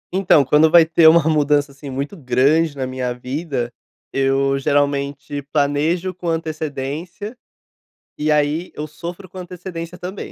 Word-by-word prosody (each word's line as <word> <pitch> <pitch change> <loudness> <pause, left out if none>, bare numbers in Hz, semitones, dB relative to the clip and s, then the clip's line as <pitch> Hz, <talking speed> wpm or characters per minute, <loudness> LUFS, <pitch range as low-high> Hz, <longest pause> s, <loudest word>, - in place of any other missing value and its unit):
Então, 175 -7 +4
quando 150 +4 +5
vai 165 -1 +7
ter 165 0 +5
uma 165 0 +7
mudança 145 -2 +2
assim 140 +1 -10
muito 140 +8 -4
grande 145 +3 +2
na 130 - -2
minha 130 -1 -3
vida, 125 -1 -4 0.4
eu 135 0 +1
geralmente 140 0 -1
planejo 155 +5 +1
com 180 0 -7
antecedência, 160 - -4 0.8
e 155 +1 0
aí 150 +3 +1
eu 150 - -5
sofro 170 +5 -8
com - - -12
antecedência 180 -1 -7
também, 185 +3 -6
150 Hz, 140 wpm, -20 LUFS, 140-170 Hz, 0.8 s, vai